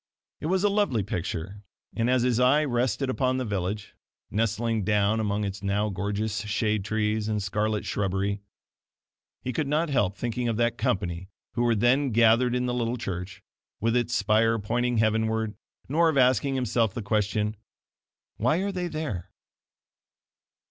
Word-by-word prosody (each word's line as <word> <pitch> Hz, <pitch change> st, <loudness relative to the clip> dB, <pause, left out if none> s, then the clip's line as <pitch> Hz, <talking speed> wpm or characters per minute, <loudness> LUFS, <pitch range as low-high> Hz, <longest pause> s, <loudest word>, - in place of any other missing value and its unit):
It 155 Hz, -, -3 dB
was 190 Hz, +2 st, +1 dB
a 205 Hz, -, +4 dB
lovely 200 Hz, -, +1 dB
picture; 90 Hz, +1 st, -4 dB, 0.3 s
and 115 Hz, +1 st, +1 dB
as 125 Hz, -1 st, +3 dB
his 125 Hz, -2 st, +2 dB
eye 130 Hz, +5 st, +4 dB
rested 130 Hz, +1 st, 0 dB
upon 130 Hz, 0 st, 0 dB
the 130 Hz, -, -2 dB
village, 100 Hz, 0 st, -3 dB, 0.4 s
nestling 115 Hz, +1 st, 0 dB
down 105 Hz, +2 st, +2 dB
among 105 Hz, -1 st, 0 dB
its 100 Hz, -1 st, -4 dB
now 100 Hz, +1 st, 0 dB
gorgeous 100 Hz, +2 st, -2 dB
shade 105 Hz, 0 st, 0 dB
trees 105 Hz, +1 st, 0 dB
and 105 Hz, -1 st, 0 dB
scarlet 105 Hz, +2 st, -1 dB
shrubbery, 100 Hz, +1 st, -1 dB, 1.0 s
he 130 Hz, -, -3 dB
could 150 Hz, +3 st, -1 dB
not 150 Hz, +2 st, +1 dB
help 100 Hz, -7 st, +1 dB
thinking 120 Hz, 0 st, -2 dB
of 115 Hz, -2 st, 0 dB
that 120 Hz, 0 st, +1 dB
company 95 Hz, -2 st, -1 dB, 0.2 s
who -, -, -1 dB
were 120 Hz, -1 st, +3 dB
then 130 Hz, +6 st, +3 dB
gathered 115 Hz, +2 st, +4 dB
in 125 Hz, 0 st, 0 dB
the 125 Hz, -, -1 dB
little 120 Hz, 0 st, -1 dB
church, 90 Hz, -3 st, -5 dB, 0.4 s
with 115 Hz, +2 st, +1 dB
its 120 Hz, 0 st, +1 dB
spire 115 Hz, +2 st, +3 dB
pointing 120 Hz, +3 st, 0 dB
heavenward 110 Hz, 0 st, +1 dB, 0.3 s
nor 165 Hz, +4 st, +3 dB
of 150 Hz, -, 0 dB
asking 130 Hz, +1 st, +3 dB
himself 115 Hz, -4 st, +1 dB
the 120 Hz, -, -3 dB
question: 105 Hz, +1 st, 0 dB, 0.8 s
"Why 125 Hz, +8 st, +2 dB
are 200 Hz, -, -1 dB
they 180 Hz, -2 st, -2 dB
there?" 120 Hz, -, -4 dB
110 Hz, 160 wpm, -27 LUFS, 105-125 Hz, 1.0 s, a